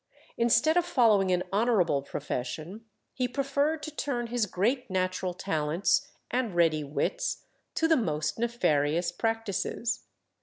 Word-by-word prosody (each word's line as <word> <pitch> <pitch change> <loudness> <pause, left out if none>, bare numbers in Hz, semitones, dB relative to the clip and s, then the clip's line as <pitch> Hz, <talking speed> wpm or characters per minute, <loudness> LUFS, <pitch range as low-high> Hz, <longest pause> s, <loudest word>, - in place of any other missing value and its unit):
Instead 240 +8 +3
of 350 - +4
following 220 - +3
an 180 0 +2
honourable 200 - +2
profession, 155 - -5 0.3
he 255 -1 0
preferred 280 +4 0
to 310 - -5
turn 245 -6 -2
his 235 -2 0
great 235 +8 0
natural 185 0 -1
talents 175 - 0 0.2
and 245 -7 -1
ready 160 -3 +3
wits - - -2 0.3
to 325 - +2
the 325 - +5
most 155 - -1
nefarious 170 -9 +1
practices. 225 0 -2
220 Hz, 125 wpm, -28 LUFS, 175-250 Hz, 0.3 s, the